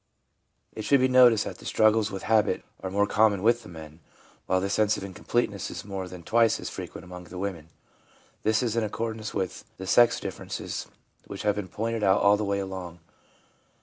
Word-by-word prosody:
It 110 - -6
should 140 +5 +3
be 130 - +4
noticed 125 -4 +6
that - - -7
the - - -13
struggles 110 -1 +3
with 95 - -6
habit 110 -2 +2 0.2
are 95 - -4
more 100 +2 +2
common 105 -2 +2
with 120 +1 +3
the 110 - -13
men, 80 -2 -11 0.5
while 95 - +2
the 95 - -1
sense 105 +2 +2
of - - -6
incompleteness 100 +1 -2
is 90 +2 -7
more 95 -2 -5
than 90 -1 -10
twice 115 +4 +3
as - - -6
frequent - - -8
among 90 0 -10
the 90 +1 -10
women. 90 -5 -4 0.7
This 110 +2 +2
is 115 -2 -1
in 115 - +1
accordance 110 +1 -4
with 95 -2 -3
the 95 - -7
sex 120 +6 +5
differ - - -6
ences - - -5 0.4
which 100 - -7
have 105 -1 +3
been 105 -2 -5
pointed 115 +4 -3
out 95 -1 +4
all 100 +1 +6
the 105 - -2
way 100 -1 0
along. 95 -3 -6
100 Hz, 205 wpm, -27 LUFS, 95-110 Hz, 0.7 s, noticed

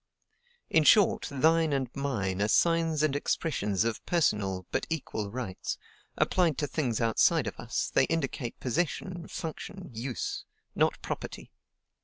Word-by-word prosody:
In 160 - +5
short, 205 +5 +5
THINE 160 +2 +3
and 135 -2 0
MINE 100 -9 -1
are 105 - +3
signs 165 +3 +3
and 145 -2 +2
expressions 105 - 0
of 115 -1 -2
personal, 100 - +1
but - - -1
equal, 120 -10 -3
rights; 110 -4 -4 0.4
applied 170 -6 +2
to 145 - 0
things 135 -5 -1
outside 115 -2 +3
of - - -5
us, - - -2
they - - +5
indicate 135 -6 -2
possession, 170 +5 -2
function, 175 +1 -6
use, 120 +3 -3 0.3
not - - +2
property. - - -6
140 Hz, 135 wpm, -29 LUFS, 115-165 Hz, 0.4 s, In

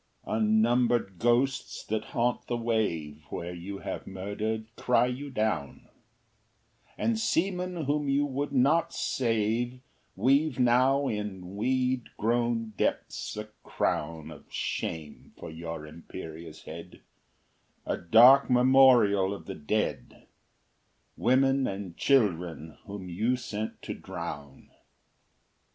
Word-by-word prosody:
II - - -2
Unnumbered 110 -2 +2
ghosts 125 +3 +1
that 110 0 -2
haunt 120 +1 -1
the 120 - -1
wave, 95 -11 -1
Where 85 +1 -5
you 90 +3 -7
have - - -5
murdered, 110 +4 -4
cry 125 -1 +3
you 130 +3 -4
down; 110 - -2 1.1
And 230 -1 0
seamen 180 -4 0
whom 145 0 0
you 140 +1 +2
would 145 +1 -3
not 140 +5 +3
save, 120 +1 0 0.4
Weave 135 +6 +2
now 130 +3 +3
in 100 -4 -4
weed 130 +2 0
grown 115 0 0
depths - - -2
a 105 - -4 0.2
crown 80 0 -2
Of 75 - -14
shame 80 -2 -4
for - - -8
your 80 -1 -6
imperious 80 0 -10
head, - - -10 0.8
A - - -1
dark 125 +10 +6
memorial 125 -6 +5
of - - -12
the 95 - -5
dead, 100 +7 -3 0.9
Women 135 +2 +3
and 95 -3 -5
children 90 - +1
whom 100 -2 -7
you 110 +8 0
sent 110 -3 -5
to - - -4
drown. 70 -2 -8
115 Hz, 115 wpm, -28 LUFS, 95-130 Hz, 1.1 s, dark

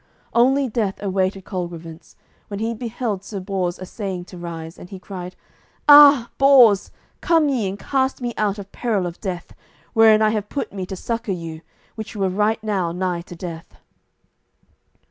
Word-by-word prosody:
Only 265 +3 +3
death 215 -4 -2
awaited 190 -1 -1
Colgrevance, 170 -3 -7 0.3
when 200 -1 -6
he 225 +1 -1
beheld 225 -3 -4
Sir 200 0 -6
Bors 185 -2 -2
assaying 185 -1 -5
to 180 - -12
rise, 165 0 -7
and 180 - -11
he 195 - -8
cried, 185 -1 -8 0.5
"Ah, 290 -4 +8
Bors, 255 -8 +6 0.3
come 325 -4 +3
ye 235 -8 0
and 195 - -6
cast 265 +3 -1
me 240 -2 -3
out 210 -1 0
of 200 -1 -9
peril 215 -7 -1
of 175 -1 -7
death, 185 -4 -5 0.4
wherein 220 -2 +6
I 215 - +3
have 210 -2 -3
put 280 - -4
me 190 -2 -5
to 190 - -5
succour 230 0 -3
you, 165 -2 -7 0.3
which 220 0 -8
were 195 -2 0
right 210 +3 0
now 195 -6 -1
nigh 180 0 -2
to 175 - -11
death." 165 -1 -8
200 Hz, 165 wpm, -21 LUFS, 180-230 Hz, 0.5 s, Ah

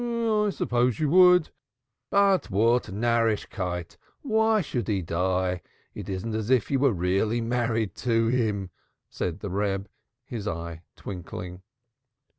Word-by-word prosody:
"Yes, 225 -4 0
I - - -19
suppose 120 -2 +1
you 150 -2 +1
would. 180 -1 +6 0.6
But 200 -1 +3
what 115 +5 +3
Narrischkeit! 105 -5 -1 0.3
Why 220 -3 +3
should 125 -7 -3
he 100 -4 0
die? 90 +2 0 0.3
It - - -8
isn't 95 +4 -3
as 110 0 -3
if 130 -2 +2
you 135 - +2
were 140 -1 +4
really 95 +5 0
married 115 -2 -1
to 115 -2 +1
him," 110 -6 0 0.4
said 90 +2 -3
the 100 - -5
Reb, 100 0 -1 0.4
his 115 -5 -6
eye 85 0 -5
twinkling. 90 -1 -7
115 Hz, 135 wpm, -26 LUFS, 95-130 Hz, 0.6 s, would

